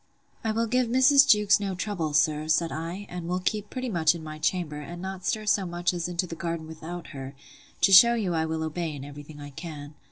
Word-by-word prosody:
I 220 - 0
will 225 +2 0
give 250 +2 +1
Mrs. 265 +4 +6
Jewkes 210 -1 +5
no 195 -2 -3
trouble, 180 -5 -3
sir, 150 +1 +2
said 165 +1 +2
I; 165 +7 -5
and 175 -1 -6
will 180 +1 -1
keep 210 +2 -2
pretty 255 0 -4
much 170 -6 +2
in 165 - -8
my 155 0 -8
chamber, 160 -2 -1
and 170 +4 -8
not 190 0 -6
stir 215 -1 -1
so 205 -1 +2
much 175 0 -1
as 175 -1 -2
into 175 +1 -1
the 170 - -8
garden 165 -1 -4
without 160 +2 -8
her; 135 -1 -8 0.5
to 195 - +4
shew 235 +5 +9
you 200 -6 -1
I 160 -1 0
will 160 0 -2
obey 160 0 -3
in 140 -1 -8
every 145 0 -9
thing 150 0 -13
I 145 0 -9
can. 145 -1 -8
175 Hz, 235 wpm, -26 LUFS, 155-200 Hz, 0.5 s, shew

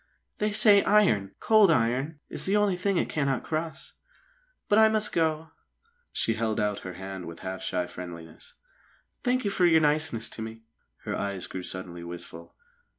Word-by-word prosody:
"They 210 0 +1
say 205 -1 +6
iron 110 - +3
cold 215 -3 +5
iron 135 +2 +1
is - - -3
the 200 +2 +3
only 205 -3 +2
thing 190 +1 0
it - - +1
cannot 140 -4 -1
cross. 160 +1 -4 0.7
But 210 - +4
I 220 0 +7
must 215 -1 0
go!" 160 -1 0 0.6
She 115 - 0
held 110 -1 -1
out 105 -1 0
her 90 - -7
hand 95 0 -7
with 85 0 -9
half 95 0 -5
shy 90 -1 -1
friendliness. 85 -3 -10 0.7
"Thank 255 -2 +1
you 200 - +1
for 180 -2 +3
your 160 -2 +5
niceness 150 -6 +1
to - - -8
me." 110 0 -7 0.4
Her - - -3
eyes 100 -2 -3
grew 95 - -6
suddenly 90 -1 -7
wistful. 85 -1 -9
130 Hz, 170 wpm, -27 LUFS, -, 0.7 s, I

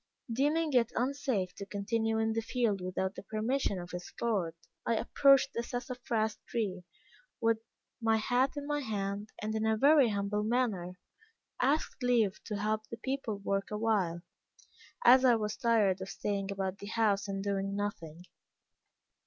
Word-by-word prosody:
Deeming 300 +5 +1
it 240 -2 +3
unsafe 250 -8 -1
to - - -7
continue 220 +3 -1
in 220 0 +1
the 225 - 0
field 225 -4 0
without 185 +1 -2
the - - -8
permission 215 +1 -1
of 175 0 -8
its 180 0 -6
lord, 195 -8 0 0.3
I 230 - +1
approached 275 +4 +4
the 235 - -1
sassafras 240 -3 -2
tree, 195 -6 -2 0.5
with 230 -2 +2 0.4
my 225 -1 +3
hat 250 +4 +1
in 285 - -4
my 295 0 -1
hand, 205 -4 -3
and 215 +1 -2
in 220 0 0
a 220 0 +2
very 280 0 +6
humble 200 0 -1
manner, 210 -6 0 0.6
asked 280 +3 +1
leave 235 -6 +2
to 210 - -3
help 215 +1 -1
the 230 - -7
people 260 -3 -3
work 195 0 -2
awhile, 210 -6 0 0.8
as 260 0 +8
I 250 -2 +6
was 210 -1 -2
tired 215 -7 +2
of 190 - -5
staying 200 -1 -2
about 195 0 -3
the 200 - -8
house 210 -2 +1
and 195 0 -3
doing 200 0 -1
nothing. 175 -5 -4
215 Hz, 160 wpm, -32 LUFS, 200-240 Hz, 0.8 s, as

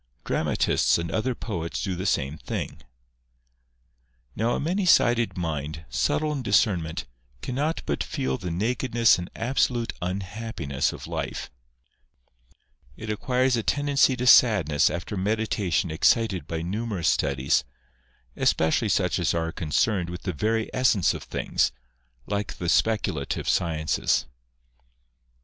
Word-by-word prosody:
Dramatists - - +1
and 85 -1 -4
other 120 +6 -1
poets 85 -9 -4
do 95 -3 -2
the 95 +3 -3
same 75 -3 -1
thing. - - -5 1.5
Now 115 +3 0
a - - -2
many 180 +6 -1
sided 120 - +3
mind, 80 -2 -4
subtle 150 - 0
in 145 -3 -2
discernment, 100 -7 +1 0.4
cannot 145 +6 -2
but - - -1
feel 135 -4 -2
the 90 -4 -4
nakedness 115 +4 +2
and 90 - -6
absolute 120 -1 0
unhappiness 90 - -3
of - - -9
life; - - -4 1.5
it 110 -1 -5
acquires 125 +4 +1
a 115 - 0
tendency 140 +1 +2
to 125 0 -3
sadness 95 - +5
after 90 +4 -4
meditation 100 -3 0
excited 95 +4 +2
by 80 -1 -3
numerous 100 -1 -2
studies, 70 -1 +1 0.7
especially 80 0 +2
such - - +1
as - - +1
are 80 0 -1
concerned 85 +3 0
with 90 +1 -7
the 95 - -2
very 110 +7 0
essence 120 -8 +3
of - - -6
things, - - 0 0.5
like 100 -1 -3
the 85 - -2
speculative 110 +3 0
sciences. 80 -4 +1
100 Hz, 125 wpm, -25 LUFS, 85-120 Hz, 1.5 s, sadness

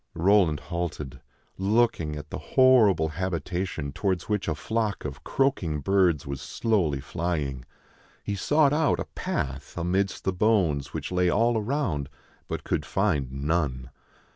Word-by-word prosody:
Roland 90 -4 +3
halted, 85 -6 -5 0.4
looking 100 -6 +1
at 75 0 -8
the - - -4
horrible 110 -11 +4
habitation 85 -3 -3
towards 95 +4 -1
which 105 -2 -1
a 80 - 0
flock 110 +4 -2
of 70 -1 -6
croaking 95 - 0
birds 90 -2 +2
was 70 -1 -5
slowly 95 -12 0
flying. 70 -4 -3 0.6
He 105 - -3
sought 145 +8 +3
out 155 0 +2
a - - -2
path 70 +2 -4
amidst 95 +3 0
the 95 - 0
bones 90 -9 +1
which - - -5
lay 90 -1 +2
all 115 +6 +2
around, 105 - -1 0.4
but - - -4
could - - -1
find 75 -10 0
none. 70 -2 -1
90 Hz, 140 wpm, -26 LUFS, 75-105 Hz, 0.6 s, horrible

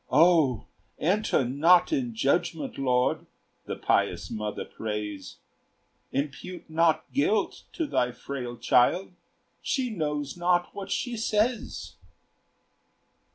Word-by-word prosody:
"O 150 - +4 0.3
enter 185 -5 +1
not 165 - +4
in 250 -6 -1
judgment, 175 -9 0
Lord!" 125 -2 +1 0.4
The - - -4
pious - - 0
mother 105 -1 -4
prays; 105 -3 -5 0.7
Impute 145 +6 -4
not 160 0 +3
guilt 370 +11 +1
to 330 - -1
thy 125 - +1
frail 125 -1 -6
child! 130 +13 +3 0.5
She 260 -4 -1
knows 150 -6 -2
not 175 0 +1
what 200 -1 -7
she 245 -1 -2
says. 220 +1 -1
165 Hz, 105 wpm, -27 LUFS, 125-210 Hz, 0.7 s, O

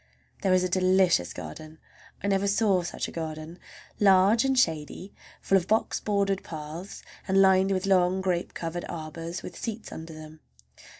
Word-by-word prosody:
There 195 - +1
is 185 - +2
a - - +1
delicious 185 - +3
garden! 155 - -9 0.5
I - - -1
never 200 0 +1
saw 200 -2 +2
such 170 - -4
a - - -8
garden—large 180 +6 +1
and 265 -1 +1
shady, 165 -1 0 0.3
full 195 - +4
of 180 - -9
box 220 +1 +1
bordered 200 -2 0
paths, 160 +4 -8 0.2
and 190 0 +3
lined 190 0 +5
with 190 0 0
long 185 -1 +3
grape 180 -2 -2
covered 170 +1 -4
arbors 165 +1 -6
with - - -8
seats 225 -1 -6
under 160 0 -8
them. 155 0 -11
185 Hz, 160 wpm, -27 LUFS, 165-195 Hz, 0.5 s, lined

